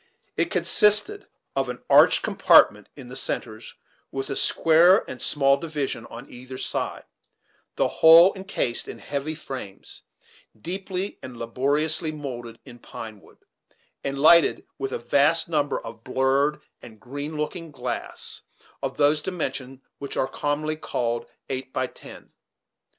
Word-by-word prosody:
It - - 0
consisted 210 - +4 0.3
of - - -1
an - - -7
arched - - +5
compartment - - +4
in 135 -4 -11
the 125 - -9
centres 110 -4 -2 0.4
with 135 0 -4
a - - -2
square 170 +8 +4
and 130 - -8
small 140 -1 +4
division 145 -6 -4
on - - -11
either 130 +1 -10
side, - - -3 0.7
the - - +1
whole 165 +4 +7
incased 190 -11 -2
in - - -8
heavy 145 +2 -4
frames, 130 -10 -9 0.6
deeply 190 - -4
and 125 -2 -10
laboriously 145 +7 0
moulded 120 -6 -8
in 120 - -13
pine 110 -3 -10
wood, - - -23 0.6
and 140 0 -3
lighted 160 +3 +5
with 135 -1 -3
a - - -2
vast 145 +7 +3
number 150 -3 -1
of 115 0 -11
blurred 135 +3 0 0.2
and 110 -3 -14
green 145 +5 -7
looking 165 +2 -4
glass 145 - -4 0.4
of 135 -1 -4
those 150 +1 +3
dimensions 135 -7 -5 0.2
which 140 - -6
are 130 - +1
commonly 150 +2 -3
called 120 -5 -3 0.2
"eight 130 0 -5
by 130 - -1
ten." - - -13
140 Hz, 140 wpm, -24 LUFS, 130-155 Hz, 0.7 s, whole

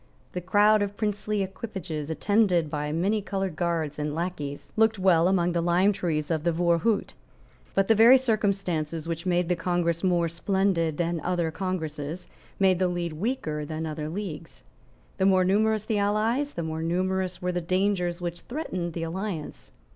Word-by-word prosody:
The 180 - -4
crowd 205 +4 +4
of 205 0 -2
princely 210 -1 -1
equipages, 185 -6 -5
attended 180 -2 +2
by 150 -1 -2
manycoloured 195 +1 -1
guards 160 -3 -1
and 150 0 -2
lacqueys, 160 -5 -4
looked 220 0 +3
well 180 -3 +4
among 180 -2 +2
the 170 -1 0
lime 175 +4 +3
trees 160 -4 -2
of 160 -2 0
the 170 - +2
Voorhout. 175 +6 +1 0.6
But 195 0 +3
the 225 - +6
very 230 +4 +8
circumstances 195 - -1
which 170 +2 -4
made 175 -1 +2
the 180 - +1
Congress 170 0 -1
more 175 -2 +2
splendid 170 -2 0
than 170 -1 -1
other 175 -2 0
congresses 160 -3 -4 0.3
made 190 -2 +3
the 185 - +3
league 175 -2 -2
weaker 155 - -2
than 155 +2 -4
other 155 -1 -4
leagues. 165 -3 -6 0.6
The 190 - +4
more 185 -1 +4
numerous 215 +2 +2
the 215 -2 0
allies, 220 +8 +1
the 170 - -2
more 160 0 -3
numerous 185 +2 -1
were 180 0 -1
the 175 0 -2
dangers 185 0 0
which 175 -1 -4
threatened 185 - -4
the 165 - -3
alliance. 165 - -5
180 Hz, 165 wpm, -26 LUFS, 165-200 Hz, 0.6 s, very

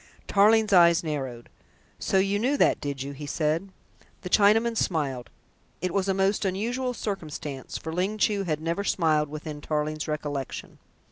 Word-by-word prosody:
Tarling's 215 +1 +4
eyes 170 -2 +6
narrowed. 135 -7 -4 0.5
"So - - +1
you 195 +1 +2
knew 265 +6 +1
that, - - +3
did 140 -2 -3
you?" 140 - -5
he 145 +1 -8
said. 160 +6 -1 0.5
The 180 - -6
Chinaman 225 +3 +4
smiled. 140 - -1 0.5
It 180 +1 -2
was 195 -1 0
a 190 - +2
most 195 +2 +1
unusual 240 +7 -1
circumstance, 155 - -5
for 160 - -6
Ling 190 +5 -1
Chu 210 -1 +2
had 155 -5 -2
never 170 +5 -1
smiled 155 -6 +1
within 150 0 -7
Tarling's 155 0 -2
recollection. 145 -3 -4
170 Hz, 155 wpm, -26 LUFS, 150-200 Hz, 0.5 s, eyes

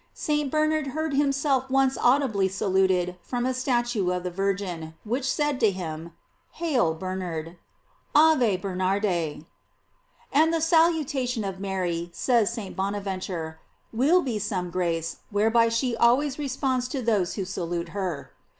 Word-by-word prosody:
St. 295 -2 -1
Bernard 310 0 +1
heard 315 -2 -1
him 280 0 +3
self 275 -2 0
once 270 0 +3
audibly 245 -7 +2
saluted 190 -2 +1
from 245 +4 -3
a 260 - +1
statue 240 -6 0
of 180 0 -1
the 180 - -3
Virgin, 180 -4 -3
which 250 +5 -1
said 295 -3 0
to 220 - +4
him, 170 -3 -5 0.4
Hail 260 - +1
Bernard: 175 -2 -5 0.6
"Ave 295 -10 +5
Bernarde." 190 +2 -1
f 165 -6 -2 0.9
And 315 +3 +4
the 330 - +1
salutation 310 -7 +2
of 195 -1 -4
Mary, 180 -3 -2
says 230 +3 +2
St. 225 -5 -6
Bonaventure, 190 -5 -3 0.3
will 305 +10 +4
be 235 -5 -2
some 185 -4 -3
grace, 170 -2 -1
whereby 225 +3 +3
she 235 +1 0
always 260 +5 +3
responds 260 -2 -1
to 260 0 -4
those 210 -6 +1
who 195 - -3
salute 175 -2 -3
her. 170 -7 -4
210 Hz, 140 wpm, -26 LUFS, 180-265 Hz, 0.9 s, Ave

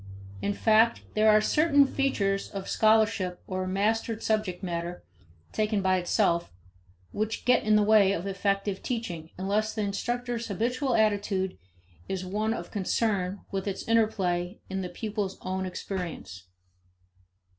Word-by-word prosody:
In 205 - -1
fact, 225 +2 +4
there 215 0 +4
are 215 0 +6
certain 285 +4 +4
features 205 -8 0
of 195 -1 -6
scholarship 215 -4 +2
or 185 -1 -3
mastered 220 +4 0
subject 215 -5 -1
matter 175 0 -4 0.5
taken 215 -2 0
by 185 0 +3
itself 170 - +1 0.6
which 215 +1 -3
get 250 0 +4
in 215 0 +3
the 210 - +5
way 205 -2 +5
of 190 -2 -2
effective 195 0 -1
teaching 180 -10 -4
unless 210 +3 0
the 215 - -1
instructor's 240 +3 -2
habitual 245 +6 0
attitude 205 -3 +1 0.5
is 185 -1 -3
one 210 +4 -1
of - - -7
concern 200 -2 -1
with 195 0 -3
its 195 - -4
interplay 195 -5 +1
in 190 0 -2
the 180 - -4
pupil's 205 -3 -4
own 190 0 -2
experience. 175 - -6
205 Hz, 135 wpm, -28 LUFS, 185-220 Hz, 0.6 s, are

